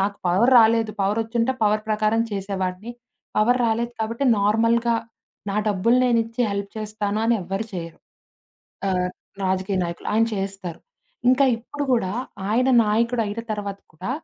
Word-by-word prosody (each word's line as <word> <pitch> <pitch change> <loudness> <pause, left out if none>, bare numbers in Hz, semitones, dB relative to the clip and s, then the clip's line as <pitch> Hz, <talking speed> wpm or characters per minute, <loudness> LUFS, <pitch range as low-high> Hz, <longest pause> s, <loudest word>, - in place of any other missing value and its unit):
నాకు 200 +1 0
పవర్ 200 +9 +3
రాలేదు. 225 -1 +4
పవరొచ్చుంటే 225 +5 0
పవర్ 215 0 +2
ప్రకారం 215 +1 +2
చేసేవాడిని. 195 +1 -3 0.5
పవర్ 245 +4 +3
రాలేదు. 235 +1 0
కాబట్టి 230 +5 -2
నార్మల్‌గా 230 +3 +2 0.6
నా 195 - -2
డబ్బులు 210 +5 +2
నేనిచ్చి 230 -1 +1
హెల్ప్ 200 0 -3
చేస్తాను 215 0 -2
అని 235 - +4
ఎవ్వరు 195 +5 -3
చేయరు. 165 -2 -6 0.9
ఆహ్, 180 -1 0 0.3
రాజకీయ 190 +1 0
నాయకులు, 170 0 -5
ఆయన 225 +1 +4
చేస్తారు. 195 -3 -5 0.5
ఇంకా 275 +2 +4
ఇప్పుడు 285 +5 -5
కూడా 200 -6 +1 0.4
ఆయన 250 +4 +2 0.2
నాయకుడయిన 225 0 0
తర్వాత 200 -2 -4 0.2
కూడా 185 +9 -5
215 Hz, 130 wpm, -23 LUFS, 195-230 Hz, 0.9 s, రాలేదు